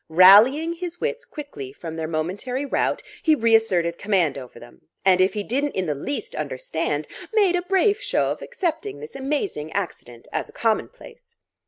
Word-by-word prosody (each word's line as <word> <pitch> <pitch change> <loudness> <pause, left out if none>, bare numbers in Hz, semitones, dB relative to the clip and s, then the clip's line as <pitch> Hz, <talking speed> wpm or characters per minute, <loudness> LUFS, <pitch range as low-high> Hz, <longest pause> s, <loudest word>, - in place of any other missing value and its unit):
Rallying 215 - +7
his 350 0 -6
wits 485 +1 -2
quickly 215 - -8
from 160 +3 -8
their 160 -1 -3
momentary 190 - -3
rout, 280 - 0 0.2
he 315 -2 +4
reasserted 220 - +2
command 185 -8 +1
over 125 -3 -9
them, 120 +1 -15 0.2
and 185 -1 +5
if 190 +3 +2
he 210 - -2
didn't 280 +7 -1
in 185 - 0
the 155 - 0
least 280 - -5
understand, - - -3 0.2
made 405 -5 +3
a 355 - +1
brave 390 +3 +2
show - - 0
of - - -5
accepting 380 +3 -3
this 455 - -10
amazing 270 - -3
accident 120 -11 -5
as - - -2
a - - -16
commonplace. 465 - -3
230 Hz, 170 wpm, -23 LUFS, -, 0.2 s, Rallying